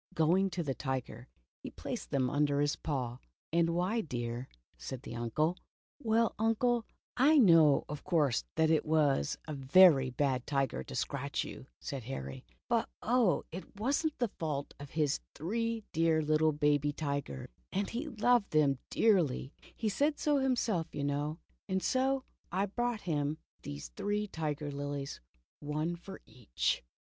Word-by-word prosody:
Going 180 Hz, +5 st, +3 dB
to 175 Hz, -2 st, -3 dB
the 140 Hz, -3 st, -1 dB
tiger, 130 Hz, -3 st, -4 dB, 0.3 s
he -, -, -6 dB
placed -, -, -6 dB
them 130 Hz, -2 st, +1 dB
under 145 Hz, +1 st, +1 dB
his 145 Hz, 0 st, +2 dB
paw. 125 Hz, -5 st, -3 dB, 0.3 s
"And 170 Hz, 0 st, +3 dB
why, 180 Hz, +7 st, +1 dB
dear?" 120 Hz, -, -4 dB, 0.3 s
said 90 Hz, -, -7 dB
his -, -, -6 dB
uncle. 135 Hz, +9 st, 0 dB, 0.5 s
''Well, 225 Hz, 0 st, +2 dB
Uncle, 225 Hz, +1 st, +2 dB, 0.3 s
I 290 Hz, +5 st, +6 dB
know, 165 Hz, -, +6 dB
of 150 Hz, 0 st, -6 dB
course, 150 Hz, -9 st, +2 dB
that 160 Hz, 0 st, +3 dB
he 160 Hz, -, +5 dB
was 150 Hz, -, +2 dB
a 155 Hz, -, -4 dB
very 140 Hz, 0 st, +6 dB
bad 130 Hz, -1 st, 0 dB
tiger 135 Hz, -2 st, 0 dB
to -, -, -8 dB
scratch 140 Hz, 0 st, -2 dB
you," 135 Hz, -, -9 dB
said 135 Hz, -6 st, -5 dB
Harry, 130 Hz, 0 st, -6 dB, 0.2 s
"but 235 Hz, -1 st, +1 dB
oh, 230 Hz, -, +3 dB
it 185 Hz, +4 st, -9 dB
was 270 Hz, +8 st, +1 dB
n't 315 Hz, -2 st, -1 dB
the 240 Hz, -5 st, 0 dB
fault 145 Hz, -3 st, -2 dB
of 145 Hz, -1 st, -8 dB
his 150 Hz, -2 st, +1 dB, 0.2 s
three 225 Hz, +7 st, -2 dB
dear 160 Hz, -1 st, +3 dB
little 155 Hz, +1 st, +3 dB
baby 145 Hz, -1 st, +2 dB
tigers 140 Hz, -, -4 dB
— -, -, -45 dB
and 200 Hz, +1 st, -1 dB
he 250 Hz, +7 st, -3 dB
loved 245 Hz, -3 st, +2 dB
them 145 Hz, -4 st, +3 dB
dearly 170 Hz, -, +2 dB
— -, -, -21 dB
he 220 Hz, -, -1 dB
said 290 Hz, +9 st, +1 dB
so 295 Hz, -2 st, +2 dB
him 265 Hz, -1 st, +2 dB
self, 185 Hz, -9 st, 0 dB
you 140 Hz, -, -2 dB
know, 145 Hz, +2 st, -1 dB, 0.3 s
and 190 Hz, 0 st, 0 dB
so 265 Hz, 0 st, +1 dB
— -, -, -42 dB
I 190 Hz, +3 st, +1 dB
brought 240 Hz, +2 st, -2 dB
him 150 Hz, -3 st, -1 dB, 0.2 s
these 70 Hz, -3 st, -7 dB
three 205 Hz, -, -1 dB
tiger 150 Hz, -5 st, -3 dB
lilies, 140 Hz, 0 st, -4 dB, 0.4 s
one 155 Hz, +3 st, -2 dB
for 190 Hz, +3 st, -10 dB
each." 110 Hz, -, -1 dB
155 Hz, 165 wpm, -32 LUFS, 140-205 Hz, 0.5 s, I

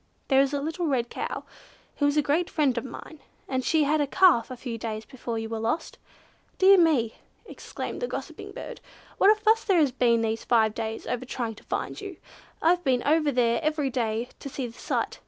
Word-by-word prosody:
There 270 Hz, -1 st, +5 dB
is 275 Hz, 0 st, +1 dB
a 285 Hz, -, -1 dB
little 325 Hz, +4 st, -2 dB
red 245 Hz, -5 st, 0 dB
cow -, -, -4 dB, 0.5 s
who 285 Hz, -, +2 dB
is 290 Hz, +1 st, +1 dB
a 300 Hz, -, +4 dB
great 320 Hz, +5 st, +1 dB
friend 285 Hz, -6 st, +1 dB
of 235 Hz, -, -2 dB
mine, 275 Hz, +4 st, -10 dB, 0.3 s
and 260 Hz, -1 st, -1 dB
she 315 Hz, +1 st, +3 dB
had 300 Hz, +1 st, +2 dB
a 290 Hz, -, 0 dB
calf 330 Hz, -8 st, +4 dB
a 255 Hz, -, -7 dB
few 235 Hz, -2 st, -6 dB
days 220 Hz, -1 st, -4 dB
before 240 Hz, -3 st, -5 dB
you 225 Hz, 0 st, -3 dB
were 225 Hz, 0 st, -4 dB
lost. 230 Hz, +8 st, -2 dB, 0.6 s
Dear 385 Hz, 0 st, +7 dB
me!" 280 Hz, -10 st, +2 dB, 0.3 s
exclaimed -, -, -7 dB
the -, -, -1 dB
gossiping -, -, -7 dB
bird, -, -, -8 dB, 0.4 s
"what 395 Hz, -, +6 dB
a 430 Hz, 0 st, +5 dB
fuss 440 Hz, +1 st, +3 dB
there 390 Hz, -4 st, +2 dB
has 295 Hz, -5 st, +4 dB
been 235 Hz, -2 st, +2 dB
these 225 Hz, 0 st, -1 dB
five 220 Hz, -3 st, +3 dB
days 225 Hz, -1 st, -4 dB
over 250 Hz, 0 st, -3 dB
trying 240 Hz, -3 st, -4 dB
to 215 Hz, -, -16 dB
find -, -, -4 dB
you! 395 Hz, -4 st, -7 dB, 0.5 s
I've 350 Hz, +2 st, +3 dB
been 255 Hz, -4 st, +1 dB
over 305 Hz, 0 st, +3 dB
there 235 Hz, -2 st, +2 dB
every 305 Hz, -3 st, 0 dB
day 235 Hz, -1 st, -1 dB
to 280 Hz, -, -7 dB
see 265 Hz, -1 st, -4 dB
the 230 Hz, -, -8 dB
sight. -, -, -3 dB
265 Hz, 215 wpm, -26 LUFS, 235-315 Hz, 0.6 s, Dear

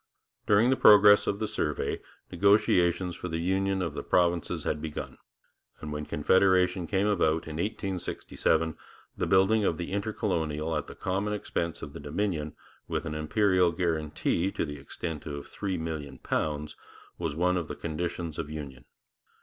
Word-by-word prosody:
During 110 Hz, +5 st, +5 dB
the -, -, +4 dB
progress 105 Hz, -3 st, +7 dB
of 100 Hz, -, 0 dB
the 110 Hz, -, -2 dB
survey 75 Hz, -6 st, -2 dB, 0.3 s
negotiations 90 Hz, -2 st, +3 dB
for -, -, -6 dB
the 80 Hz, -1 st, -2 dB
union 95 Hz, +2 st, 0 dB
of 85 Hz, -4 st, -3 dB
the -, -, -4 dB
provinces 85 Hz, -1 st, +1 dB
had 75 Hz, -, -2 dB
begun, 75 Hz, -1 st, -6 dB, 0.6 s
and 75 Hz, -1 st, -6 dB
when 75 Hz, 0 st, -4 dB
Confederation 90 Hz, +2 st, +3 dB
came 100 Hz, +1 st, +1 dB
about 80 Hz, -6 st, +1 dB
in 80 Hz, -1 st, -5 dB
1867, 90 Hz, -4 st, -1 dB, 0.4 s
the -, -, -1 dB
building 100 Hz, +3 st, +4 dB
of 80 Hz, -, +1 dB
the 85 Hz, +1 st, -5 dB
Intercolonial 85 Hz, -7 st, -1 dB
at 75 Hz, -, -2 dB
the -, -, -10 dB
common 100 Hz, +3 st, -1 dB
expense 85 Hz, -4 st, -3 dB
of 70 Hz, -, -7 dB
the 85 Hz, -, -8 dB
Dominion, 75 Hz, 0 st, -2 dB, 0.3 s
with -, -, -2 dB
an 80 Hz, -, -3 dB
imperial 90 Hz, +3 st, +2 dB
guarantee 85 Hz, +1 st, 0 dB
to -, -, -2 dB
the 75 Hz, -1 st, -7 dB
extent 80 Hz, +3 st, -6 dB
of 70 Hz, -1 st, -6 dB
£3,000,000, 75 Hz, -4 st, -3 dB, 0.4 s
was 80 Hz, -4 st, -2 dB
one 90 Hz, +2 st, +2 dB
of 85 Hz, -3 st, -2 dB
the -, -, -5 dB
conditions 85 Hz, 0 st, -4 dB
of 75 Hz, -2 st, -4 dB
union. 70 Hz, -4 st, -7 dB
85 Hz, 155 wpm, -28 LUFS, 75-95 Hz, 0.6 s, progress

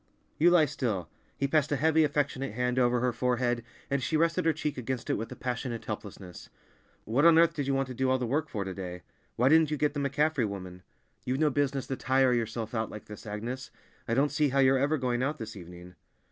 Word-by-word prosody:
"You 170 Hz, +3 st, +6 dB
lie 175 Hz, -3 st, +5 dB
still." 110 Hz, -9 st, -3 dB, 0.3 s
He 140 Hz, -, 0 dB
passed 150 Hz, +1 st, +1 dB
a -, -, +3 dB
heavy, 160 Hz, +3 st, +3 dB
affectionate 140 Hz, -5 st, -1 dB
hand 125 Hz, +2 st, 0 dB
over 120 Hz, -1 st, +2 dB
her 125 Hz, -1 st, +1 dB
forehead, 120 Hz, -1 st, 0 dB, 0.2 s
and 140 Hz, -1 st, -1 dB
she 155 Hz, +6 st, 0 dB
rested 165 Hz, 0 st, +1 dB
her 165 Hz, -, +5 dB
cheek 150 Hz, -1 st, -3 dB
against 125 Hz, -1 st, -3 dB
it -, -, +2 dB
with 115 Hz, -, -4 dB
a -, -, -6 dB
passionate 125 Hz, -2 st, -4 dB
helplessness. 100 Hz, -4 st, -8 dB, 0.6 s
"What 120 Hz, +7 st, +1 dB
on 165 Hz, -1 st, +7 dB
earth 165 Hz, 0 st, +5 dB
did 145 Hz, -3 st, -3 dB
you 135 Hz, -, +1 dB
want 135 Hz, 0 st, 0 dB
to -, -, -5 dB
do 130 Hz, +1 st, 0 dB
all 130 Hz, -, +3 dB
the 125 Hz, -, -2 dB
work 150 Hz, +6 st, -1 dB
for, 105 Hz, -3 st, -3 dB
to 95 Hz, -, -4 dB
day? 90 Hz, -2 st, -7 dB, 0.3 s
Why 125 Hz, -, +2 dB
didn't 160 Hz, +1 st, +5 dB
you 150 Hz, -, -1 dB
get 150 Hz, 0 st, +1 dB
the 145 Hz, -, -3 dB
McCaffrey 140 Hz, -2 st, +1 dB
woman? 90 Hz, -2 st, -7 dB, 0.4 s
You've 130 Hz, +1 st, -1 dB
no 150 Hz, 0 st, +2 dB
business 140 Hz, -1 st, 0 dB
to 135 Hz, -, -3 dB
tire 130 Hz, +1 st, +3 dB
yourself 115 Hz, -1 st, -2 dB
out 110 Hz, -2 st, -1 dB
like 105 Hz, -, -9 dB
this, 105 Hz, +1 st, -10 dB
Agnes. 115 Hz, +5 st, -5 dB, 0.4 s
I 115 Hz, -, 0 dB
don't 140 Hz, +3 st, +2 dB
see 150 Hz, -2 st, +2 dB
how 135 Hz, -, -1 dB
you're 135 Hz, 0 st, +5 dB
ever 145 Hz, +3 st, +2 dB
going 125 Hz, -2 st, -1 dB
out 145 Hz, +4 st, -1 dB
this 110 Hz, -5 st, -7 dB
evening!" 90 Hz, -1 st, -11 dB
130 Hz, 235 wpm, -29 LUFS, 115-145 Hz, 0.6 s, on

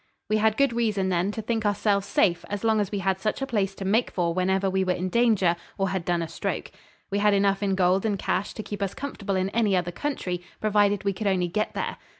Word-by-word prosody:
We 215 Hz, -, +4 dB
had 220 Hz, 0 st, +2 dB
good 275 Hz, -3 st, +3 dB
reason, 215 Hz, -5 st, 0 dB
then, 180 Hz, +2 st, +1 dB
to 220 Hz, -, -5 dB
think 225 Hz, 0 st, -1 dB
ourselves 205 Hz, -1 st, +1 dB
safe 175 Hz, -2 st, +2 dB
as 205 Hz, 0 st, -4 dB
long 220 Hz, -1 st, +3 dB
as 200 Hz, -, -3 dB
we 205 Hz, -, -1 dB
had 190 Hz, -1 st, +1 dB
such 215 Hz, +2 st, -1 dB
a 270 Hz, -, -1 dB
place 200 Hz, -6 st, -1 dB
to 195 Hz, -, -6 dB
make 220 Hz, +5 st, +2 dB
for 170 Hz, -2 st, -1 dB
whenever 190 Hz, +2 st, +1 dB
we 190 Hz, 0 st, +1 dB
were 185 Hz, -1 st, +1 dB
in 185 Hz, +1 st, -3 dB
danger 210 Hz, -5 st, +3 dB, 0.2 s
or 195 Hz, -1 st, 0 dB
had 185 Hz, -2 st, -2 dB
done 175 Hz, -1 st, +1 dB
a -, -, -4 dB
stroke. 165 Hz, -, -4 dB, 0.4 s
We 200 Hz, -, +1 dB
had 205 Hz, 0 st, +4 dB
enough 195 Hz, 0 st, +2 dB
in 195 Hz, -2 st, +1 dB
gold 185 Hz, +1 st, +3 dB
and 210 Hz, -3 st, 0 dB
cash 195 Hz, -, -2 dB
to 215 Hz, -, -5 dB
keep 205 Hz, -1 st, -6 dB
us 195 Hz, -2 st, -2 dB
comfortable 210 Hz, -8 st, -4 dB
in 185 Hz, +1 st, 0 dB
any 215 Hz, -4 st, +2 dB
other 175 Hz, -1 st, 0 dB
country 180 Hz, -, -3 dB, 0.2 s
provided 205 Hz, -2 st, +2 dB
we 200 Hz, 0 st, +1 dB
could 205 Hz, +2 st, -3 dB
only 185 Hz, -2 st, +2 dB
get 215 Hz, +4 st, -2 dB
there. -, -, -3 dB
200 Hz, 250 wpm, -26 LUFS, 185-215 Hz, 0.4 s, We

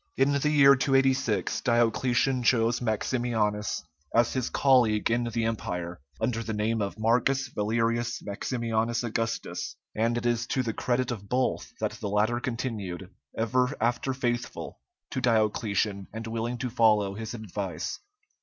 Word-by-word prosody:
In 135 Hz, +2 st, +4 dB
the 140 Hz, +1 st, +1 dB
year 140 Hz, -2 st, +7 dB
286, 135 Hz, -6 st, +1 dB
Diocletian 120 Hz, +2 st, +2 dB
chose 120 Hz, 0 st, +2 dB
Maximianus 110 Hz, -2 st, -1 dB, 0.3 s
as 120 Hz, 0 st, +4 dB
his 130 Hz, -2 st, -1 dB
colleague 120 Hz, -6 st, +3 dB
in 120 Hz, +1 st, +1 dB
the 115 Hz, -1 st, -1 dB
Empire, 90 Hz, -6 st, -3 dB, 0.2 s
under 115 Hz, -2 st, 0 dB
the 110 Hz, -1 st, -4 dB
name 110 Hz, +1 st, 0 dB
of 100 Hz, +1 st, -3 dB
Marcus 125 Hz, +4 st, +2 dB
Valerius 115 Hz, +2 st, 0 dB
Maximianus 115 Hz, +2 st, -1 dB
Augustus, 115 Hz, 0 st, -3 dB, 0.2 s
and 115 Hz, +2 st, +1 dB
it 120 Hz, -, -3 dB
is 120 Hz, -1 st, +1 dB
to 130 Hz, -, 0 dB
the 115 Hz, -2 st, -2 dB
credit 125 Hz, +2 st, 0 dB
of 100 Hz, -4 st, -6 dB
both 130 Hz, +1 st, 0 dB
that -, -, -1 dB
the 105 Hz, -, -2 dB
latter 110 Hz, +4 st, +1 dB
continued 105 Hz, -7 st, -4 dB, 0.3 s
ever 125 Hz, +4 st, +1 dB
after 120 Hz, +3 st, 0 dB
faithful 120 Hz, -2 st, -3 dB, 0.3 s
to 130 Hz, -, -2 dB
Diocletian 105 Hz, -3 st, +1 dB
and 110 Hz, +1 st, -6 dB
willing 115 Hz, +2 st, -3 dB
to 125 Hz, 0 st, -3 dB
follow 105 Hz, -4 st, +3 dB
his 110 Hz, +2 st, -6 dB
advice. 95 Hz, -6 st, -4 dB
115 Hz, 145 wpm, -28 LUFS, 110-125 Hz, 0.3 s, year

